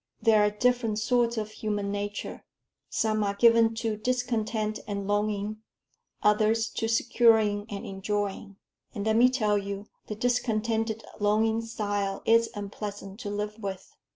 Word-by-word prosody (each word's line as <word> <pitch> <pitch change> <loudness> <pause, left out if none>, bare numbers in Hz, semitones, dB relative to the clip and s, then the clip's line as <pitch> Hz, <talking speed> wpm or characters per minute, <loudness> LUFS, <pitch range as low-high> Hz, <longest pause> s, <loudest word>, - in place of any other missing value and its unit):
There 220 -2 +4
are 210 - +4
different 230 0 +1
sorts 235 +1 +1
of 215 -1 -3
human 205 -2 -3
nature. 205 0 -4 0.5
Some 215 -1 0
are 200 0 -1
given 230 +1 +5
to 225 -2 -2
discontent 220 -2 -1
and 200 -1 -3
longing, 205 0 -1 0.7
others 215 +2 +3
to 225 - -2
securing 225 -2 +3
and 200 -1 -6
enjoying. 200 +1 -3 0.4
And 205 -1 -3
let 220 0 +2
me 245 +2 +6
tell 215 -5 +1
you, 200 0 -5 0.2
the 210 - -4
discontented 225 -1 0 0.2
longing 220 +2 +2
style 205 -3 -3
is 230 0 +4
unpleasant 200 0 -6
to 210 - -5
live 210 +1 -4
with." 195 -3 -6
215 Hz, 140 wpm, -28 LUFS, 205-225 Hz, 0.7 s, me